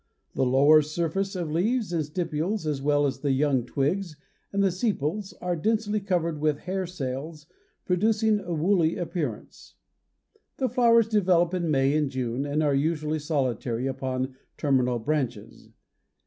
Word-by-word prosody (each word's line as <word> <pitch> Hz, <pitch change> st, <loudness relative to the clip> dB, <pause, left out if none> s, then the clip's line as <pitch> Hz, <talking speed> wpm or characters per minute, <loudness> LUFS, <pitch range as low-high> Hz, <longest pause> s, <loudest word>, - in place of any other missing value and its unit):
The 130 Hz, -, +1 dB
lower 145 Hz, +4 st, +6 dB
surface 170 Hz, +6 st, -2 dB
of 170 Hz, -4 st, -3 dB
leaves 205 Hz, +4 st, 0 dB
and 165 Hz, -2 st, +1 dB
stipules 165 Hz, +4 st, -2 dB
as 150 Hz, -3 st, -2 dB
well 145 Hz, +1 st, +2 dB
as 135 Hz, -, -2 dB
the 145 Hz, -, -1 dB
young 135 Hz, -3 st, +1 dB
twigs 155 Hz, +6 st, -1 dB, 0.4 s
and 200 Hz, 0 st, +1 dB
the 195 Hz, -, +3 dB
sepals 195 Hz, -, -2 dB
are 180 Hz, -1 st, -1 dB
densely 215 Hz, +4 st, 0 dB
covered 175 Hz, -5 st, -1 dB
with 150 Hz, -1 st, 0 dB
hair 190 Hz, 0 st, -3 dB
cells 150 Hz, -1 st, -5 dB, 0.4 s
producing 215 Hz, +3 st, +2 dB
a 175 Hz, -3 st, -7 dB
woolly 170 Hz, +1 st, +2 dB
appearance. 165 Hz, -, -5 dB, 0.8 s
The 260 Hz, -, 0 dB
flowers 230 Hz, -1 st, +4 dB
develop 185 Hz, -5 st, +2 dB
in 175 Hz, -3 st, -1 dB
May 135 Hz, 0 st, +2 dB
and 150 Hz, -2 st, +1 dB
June 130 Hz, +1 st, -2 dB
and 150 Hz, +2 st, 0 dB
are 145 Hz, -2 st, +2 dB
usually 155 Hz, +2 st, 0 dB
solitary 130 Hz, -5 st, -1 dB
upon 130 Hz, -1 st, -3 dB, 0.2 s
terminal 130 Hz, -4 st, +1 dB
branches. 120 Hz, -4 st, -3 dB
155 Hz, 150 wpm, -26 LUFS, 140-185 Hz, 0.8 s, lower